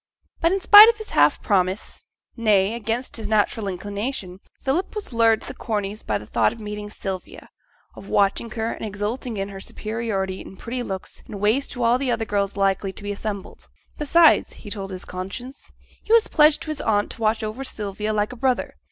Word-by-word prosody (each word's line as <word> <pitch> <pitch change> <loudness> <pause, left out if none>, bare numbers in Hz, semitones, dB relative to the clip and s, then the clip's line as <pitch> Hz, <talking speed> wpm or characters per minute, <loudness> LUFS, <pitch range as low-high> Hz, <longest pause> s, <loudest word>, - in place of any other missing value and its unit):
But 335 - +2
in 390 - +1
spite 415 +3 +10
of 465 - 0
his 435 - -9
half - - +3
promise, 190 -1 -1 0.3
nay 210 -3 +3
against 235 +3 -3
his 220 -2 -5
natural 215 0 +1
inclination, 200 0 -4 0.2
Philip 305 +11 -1
was 415 - -6
lured 225 -1 +4
to - - -10
the - - -5
Corneys' 210 -1 -3
by 105 - -1
the 105 - -10
thought 110 0 +2
of - - -10
meeting 210 -1 -6
Sylvia, 190 -3 -7 0.5
of 195 - -11
watching 200 +3 +1
her 225 0 -2
and - - -7
exulting 215 +3 -3
in 195 0 -3
her 195 -1 -8
superiority 205 -3 -3
in 190 - -11
pretty 245 +5 -4
looks 190 -5 -6
and 205 - -7
ways 220 +7 +2
to 245 - -4
all 235 +2 +3
the 270 -1 -1
other 225 -2 0
girls 200 -1 -1
likely 195 0 +1
to 205 - -11
be 205 - -3
assembled. 200 -1 -6 0.3
Besides 320 +2 +4
(he 205 - -11
told 195 -2 -4
his 185 -1 -7
conscience) 200 +9 -7 0.3
he - - -7
was 460 0 +6
pledged 300 -1 +4
to - - -8
his 305 - -4
aunt 205 -2 +1
to 230 - -11
watch 220 0 +1
over 215 +5 -4
Sylvia 210 -3 -4
like 210 +1 0
a - - -9
brother. 255 +1 -1
215 Hz, 205 wpm, -23 LUFS, 200-245 Hz, 0.5 s, spite